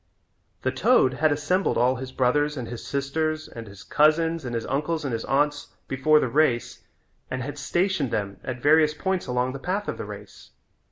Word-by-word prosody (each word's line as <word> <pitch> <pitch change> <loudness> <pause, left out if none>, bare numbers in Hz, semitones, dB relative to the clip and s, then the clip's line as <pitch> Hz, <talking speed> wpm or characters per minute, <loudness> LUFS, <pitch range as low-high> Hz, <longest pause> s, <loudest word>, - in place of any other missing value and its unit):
The - - +1
toad 130 - +3
had 155 0 +2
assembled 155 +6 +1
all 125 +2 +3
his 130 0 -7
brothers 145 +4 +1
and 125 -3 -4
his 120 -1 -7
sisters 155 +3 -2
and 115 -1 -9
his 100 -1 -12
cousins 160 +2 +2
and 120 -2 -4
his 115 - -2
uncles 155 +3 -1
and 130 - -2
his 115 - -2
aunts 145 +1 +1 0.2
before 150 +3 +3
the - - 0
race 125 -2 +1 0.5
and 130 -1 -3
had 145 +2 -6
stationed 175 -1 0
them 100 -3 -3
at 125 -1 -6
various 150 0 +5
points 190 +2 -2
along 125 +1 0
the 135 - -6
path 195 +7 -2
of - - -4
the - - -4
race. - - -11
145 Hz, 190 wpm, -25 LUFS, 125-155 Hz, 0.5 s, various